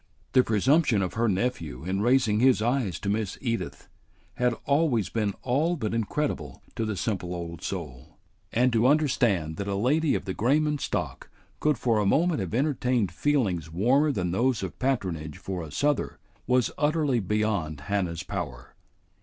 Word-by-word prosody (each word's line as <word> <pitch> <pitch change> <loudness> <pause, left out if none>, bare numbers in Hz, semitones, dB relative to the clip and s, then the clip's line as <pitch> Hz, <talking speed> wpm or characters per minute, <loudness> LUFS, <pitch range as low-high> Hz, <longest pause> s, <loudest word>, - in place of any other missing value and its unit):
The 130 - +5
presumption 115 - +3
of 90 - -3
her 115 0 +1
nephew 90 - -2
in 95 +3 -1
raising 120 -3 +3
his 130 -1 +5
eyes 115 - 0
to 100 - -5
Miss 105 -1 -1
Edith 115 -3 -3 0.5
had 125 -1 +2
always 140 - +2
been 105 -3 -1
all 150 +8 +1
but 110 -9 -3
incredible 115 - -2
to 115 - -1
the 110 -2 -3
simple 90 -3 -2
old 85 -1 -6
soul; 75 -10 -6 0.3
and 125 +1 +2
to 115 +2 +4
understand 120 - +2
that 100 - -4
a 100 - -1
lady 140 +9 +2
of - - -3
the 95 - -3
Grayman 150 +8 +1
stock - - -3 0.3
could 150 -3 +2
for 115 -2 +1
a 105 - +1
moment 165 - +2
have 95 +1 -3
entertained 125 - +1
feelings 95 - 0
warmer 130 - +3
than 90 -9 -1
those 120 +2 +1
of 95 - -6
patronage 90 - -2
for 95 -2 -5
a 80 - -7
Souther 145 - 0 0.3
was 125 -1 +2
utterly 150 -4 +2
beyond 100 -7 -1
Hannah's 90 +1 -2
power. 85 -11 -6
110 Hz, 165 wpm, -27 LUFS, 95-130 Hz, 0.5 s, The